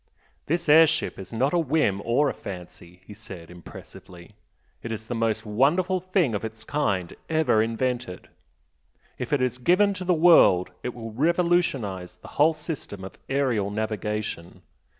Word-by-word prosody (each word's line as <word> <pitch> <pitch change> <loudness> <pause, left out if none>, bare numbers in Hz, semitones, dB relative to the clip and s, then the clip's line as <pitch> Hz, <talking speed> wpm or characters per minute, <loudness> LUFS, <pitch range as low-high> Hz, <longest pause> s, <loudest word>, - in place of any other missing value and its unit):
"This 170 +2 -1
air 160 +2 +8
ship 160 -7 -2
is 95 - -9
not 130 +6 0
a 175 - +3
'whim' 145 - +1
or 130 +6 +2
a - - -1
'fancy'" 90 -2 -10
he 105 - -11
said, 85 -4 -11
impressively 90 0 -13 0.5
"It 115 - -6
is 110 0 -5
the 120 - -5
most 115 -1 -1
wonderful 160 - +2
thing 180 - 0
of 105 - -3
its 110 0 -7
kind 100 - -1
ever 155 -9 +3
invented! 120 -2 -3 0.9
If 125 - -5
it 140 -3 +2
is 125 0 -1
given 185 +9 +3
to 185 - -6
the 180 -1 +2
world 155 - +5
it 125 - -5
will 115 -2 -7
revolutionise 135 - 0
the 90 - -14
whole 155 +2 +5
system 130 - -7
of 95 - -10
aerial 125 -8 0
navigation. 105 -4 -4
120 Hz, 160 wpm, -25 LUFS, 100-160 Hz, 0.9 s, air